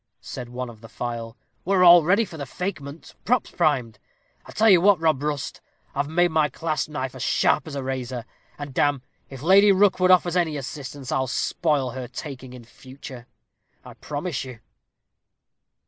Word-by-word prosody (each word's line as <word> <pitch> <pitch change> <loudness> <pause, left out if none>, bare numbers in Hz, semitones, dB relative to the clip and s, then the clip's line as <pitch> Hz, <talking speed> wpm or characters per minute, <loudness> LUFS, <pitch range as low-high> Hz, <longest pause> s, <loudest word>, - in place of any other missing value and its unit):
said 125 -2 -8
he 125 +1 -10
of 120 -4 -6
the 115 - -12
file. 115 -1 -6 0.3
"We're 190 0 +2
all 175 -1 +8
ready 195 +8 +3
for 175 - -11
the 140 -3 -6
fakement 155 -2 -6
pops 245 +1 0
primed 130 -10 0 0.5
and - - -17
I - - -10
tell 220 - +2
you 185 -5 +7
what, 200 -2 +5
Rob 160 -4 +1
Rust, 145 -2 -3 0.3
I've 140 +1 -2
made 175 +2 +2
my 155 -2 +2
clasp 155 -3 -3
knife 130 -4 -4
as 130 - -9
sharp 150 - +1
as 150 - -7
a 140 - -3
razor, 130 -2 -4 0.3
and 145 -2 -7
damme, 145 -1 +1 0.3
if 135 0 -10
Lady 200 +4 +6
Rookwood 190 -1 +3
offers 180 -1 +4
any 170 -4 +1
resistance, 140 -1 -7
I'll 130 0 0
spoil 140 0 0
her 130 -1 -6
talking 130 -2 -8
in 125 -2 -11
future, 130 0 -12 0.6
I - - -11
promise 150 +1 -4
you." 125 -3 -10
145 Hz, 180 wpm, -24 LUFS, 130-175 Hz, 0.6 s, all